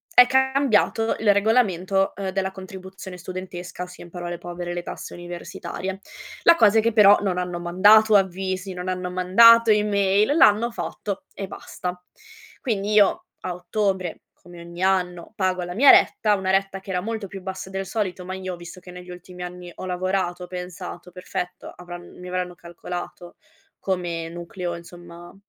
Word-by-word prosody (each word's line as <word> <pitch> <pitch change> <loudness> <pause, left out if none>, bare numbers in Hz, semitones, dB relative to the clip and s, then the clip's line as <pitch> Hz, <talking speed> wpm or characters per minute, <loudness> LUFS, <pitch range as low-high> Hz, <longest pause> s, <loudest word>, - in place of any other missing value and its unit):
è 250 0 +9
cambiato 265 -4 +2
il 210 -2 +4
regolamento, 195 -3 +2
ehm, 195 -1 -3
della 190 0 -2
contribuzione 190 -1 -9
studentesca, 180 -1 -7
ossia, 180 0 -8
in 175 - -14
parole 175 0 -5
povere, 175 0 -6
le 175 - -4
tasse - - -7
universitarie. 175 +2 -6 0.4
La 335 - +7
cosa 225 -7 +5
è - - +6
che, 230 0 +1
però, 205 -2 +7
non 185 -3 0
hanno 180 -1 -3
mandato 205 +5 +5
avvisi, 190 0 0
non 180 +1 -5
hanno 180 -1 -3
mandato 225 +6 +6
email, 210 +3 +2
l'hanno 225 -4 +5
fatto 205 -3 -5
e 195 - -5
basta. 180 -1 -6 0.6
Quindi, 210 -4 -1
io, 210 - +4
a 180 - -4
ottobre, 185 -1 -2
come 175 -1 -14
ogni 170 +1 -7
anno, 180 -1 0
pago 185 -3 0
la 175 0 -5
mia 265 +8 +6
retta, 210 -1 +5
una 190 -1 -1
retta 195 0 0
che 190 0 -8
era 180 -1 0
molto 220 +1 -4
più 195 0 -9
bassa 190 0 -6
del 195 0 -4
solito, 190 -4 -3
ma 185 +1 -5
io 185 -1 -5
visto 175 +1 -11
che 180 0 -13
negli 180 0 -11
ultimi 180 0 -10
anni 180 0 -7
ho - - -8
lavorato, 180 0 -1
ho - - -8
pensato: 180 0 -7
"Perfetto 180 0 -6
avran 175 0 -11
mi 180 - -9
avranno 180 0 -3
calcolato 175 +1 -8 0.4
come 175 -3 -2
nucleo, 175 +1 -5
insomma, 175 0 -12
185 Hz, 165 wpm, -23 LUFS, 180-200 Hz, 0.6 s, è